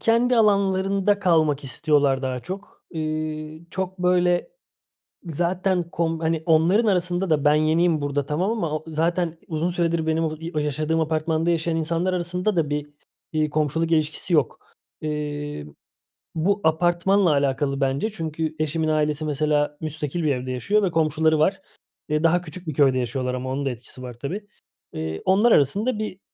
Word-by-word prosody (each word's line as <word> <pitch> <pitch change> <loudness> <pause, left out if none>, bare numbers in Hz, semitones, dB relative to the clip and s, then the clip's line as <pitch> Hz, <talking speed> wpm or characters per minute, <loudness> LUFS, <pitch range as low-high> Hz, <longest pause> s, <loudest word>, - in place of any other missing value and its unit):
kendi 235 +2 +3
alanlarında 200 -1 +2
kalmak 155 -6 +2
istiyorlar 140 0 +1
daha 130 -1 -2
çok. 190 +9 -9
Eee, 155 -1 -4
çok 190 0 -4
böyle 180 - +2 0.8
zaten 175 +2 0
kom 165 -1 -1
hani 160 -1 0
onların 170 +8 +4
arasında 180 -2 0
da 150 -2 +2
ben 145 +1 +5
yeniyim 160 +1 +2
burada 145 -1 -1
tamam 170 +8 0
ama 165 -9 -1
u - - -20
zaten 165 +1 -1
uzun 160 +2 -1
süredir 170 -2 0
benim 160 +1 +1
o 155 0 -2
i 165 +1 -6
o - - 0
yaşadığım 155 +2 0
apartmanda 160 +1 0
yaşayan 165 0 0
insanlar 165 +3 0
arasında 180 +3 -1
da 150 -3 +1
bir, 145 0 -3 0.4
eee, 155 -1 0
komşuluk 155 +2 0
ilişkisi 155 +2 0
yok. 145 -6 +2 0.4
Eee, 145 - -4 0.7
bu 200 +6 +1
apartmanla 175 +3 +3
alakalı 140 0 0
bence 135 +11 0
çünkü 160 -3 -3
eşimin 155 +1 0
ailesi, 155 0 0
mesela, 150 0 0
müstakil 155 +1 -3
bir 150 - +2
evde 130 +1 -4
yaşıyor 200 - +1
ve 180 - +1
komşuları 155 0 +2
var. 190 +5 +2 0.5
Eee, 150 +1 0
daha 175 +2 +4
küçük 175 +1 -10
bir 155 - -2
köyde 135 -2 +3
yaşıyorlar 125 +1 -2
ama 130 +1 -4
onun 140 +1 -2
da - - +1
etkisi 125 +1 -9
var 125 -1 -7
tabii. 175 - -6 0.5
Eee, 80 0 -4
onlar 205 +5 +4
arasında 210 - +2
bir 205 -3 -4
160 Hz, 160 wpm, -23 LUFS, 150-180 Hz, 0.8 s, ben